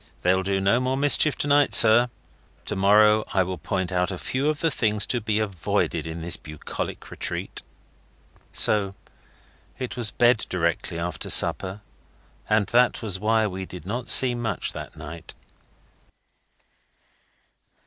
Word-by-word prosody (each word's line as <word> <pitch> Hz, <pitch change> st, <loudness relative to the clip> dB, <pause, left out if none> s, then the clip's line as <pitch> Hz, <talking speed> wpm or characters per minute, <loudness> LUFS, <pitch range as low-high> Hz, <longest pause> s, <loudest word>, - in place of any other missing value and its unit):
They'll 95 Hz, +1 st, +2 dB
do 95 Hz, 0 st, -1 dB
no 100 Hz, +5 st, +2 dB
more 130 Hz, +1 st, -1 dB
mischief 145 Hz, +1 st, +2 dB
to -, -, -3 dB
night, 145 Hz, 0 st, +3 dB
sir. 115 Hz, +2 st, +7 dB, 0.6 s
To 105 Hz, -, -3 dB
morrow 105 Hz, +2 st, +4 dB
I 95 Hz, -, +4 dB
will 90 Hz, 0 st, -6 dB
point 95 Hz, -3 st, -3 dB
out 90 Hz, 0 st, 0 dB
a 95 Hz, -, -5 dB
few 135 Hz, +10 st, -2 dB
of 155 Hz, -1 st, -2 dB
the 165 Hz, -1 st, 0 dB
things 105 Hz, -5 st, 0 dB
to 120 Hz, -, -2 dB
be 105 Hz, -1 st, -1 dB
avoided 100 Hz, -6 st, -2 dB
in 80 Hz, 0 st, -7 dB
this 85 Hz, -, 0 dB
bucolic 75 Hz, -1 st, -7 dB
retreat.' -, -, -6 dB, 0.9 s
So 100 Hz, -2 st, +1 dB, 0.8 s
it 130 Hz, -1 st, -5 dB
was 120 Hz, -4 st, 0 dB
bed 120 Hz, -2 st, +2 dB
directly 85 Hz, -1 st, -2 dB
after 85 Hz, +1 st, -5 dB
supper, 95 Hz, +3 st, +2 dB, 0.7 s
and 105 Hz, -1 st, +2 dB
that 120 Hz, 0 st, +2 dB
was 100 Hz, -4 st, -2 dB
why 110 Hz, +1 st, +1 dB
we 95 Hz, -2 st, -5 dB
did 90 Hz, -, -10 dB
not 120 Hz, +5 st, -5 dB
see 130 Hz, -2 st, +6 dB
much 115 Hz, -5 st, -3 dB
that -, -, -9 dB
night. 80 Hz, +1 st, -10 dB
105 Hz, 150 wpm, -24 LUFS, 95-120 Hz, 0.9 s, sir